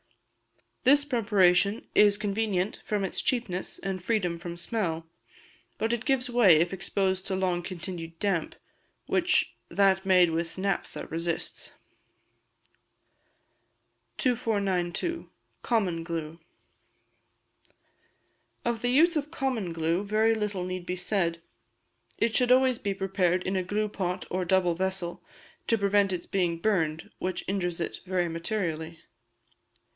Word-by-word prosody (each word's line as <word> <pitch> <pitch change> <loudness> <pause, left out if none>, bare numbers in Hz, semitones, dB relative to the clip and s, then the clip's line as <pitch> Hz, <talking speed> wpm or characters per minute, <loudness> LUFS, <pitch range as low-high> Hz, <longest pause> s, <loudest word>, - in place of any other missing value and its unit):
This 285 +3 +5
preparation 205 -5 +3
is 205 -1 +5
convenient 205 -2 -1
from 210 -2 -1
its 190 - -2
cheapness 220 -8 -1
and 190 -2 -4
freedom 185 -6 0
from 175 0 -6
smell; 170 -4 -2 0.7
but 225 +1 0
it 235 0 -2
gives 265 -3 +1
way 240 -8 +6
if 175 +4 +1
exposed 190 0 -1
to 190 - -1
long 185 -2 0
continued 170 -2 -6
damp, 190 -4 -1 0.5
which - - +2 0.2
that 190 +1 +3
made 180 -3 +5
with 165 +1 -3
naphtha 195 0 -2
resists. 165 +1 -3 2.4
2492. 215 - 0 0.3
Common 190 -8 0
Glue. 165 -1 -5 2.3
Of 235 -1 -1
the 245 - +1
use 325 +7 +5
of 300 -1 -1
common 260 - -2
glue 165 +3 0
very 215 +2 +2
little 210 -4 -2
need 185 -1 -5
be 180 - -1
said; 175 -3 0 0.7
it 230 -1 +1
should 250 -1 +3
always 255 -1 +4
be 200 -1 -2
prepared 190 -2 +1
in 190 - -2
a 185 - +1
gluepot 195 -1 -2
or 185 0 -1
double 180 -1 +3
vessel, 185 0 -3 0.4
to 230 - +3
prevent 200 -1 +2
its 175 -2 -3
being 175 -3 0
burned, 165 -5 0
which 185 -1 -3
injures 180 -3 -1
it 170 - -3
very 180 -1 +1
materially. 165 -2 -3
190 Hz, 125 wpm, -28 LUFS, 175-215 Hz, 2.4 s, way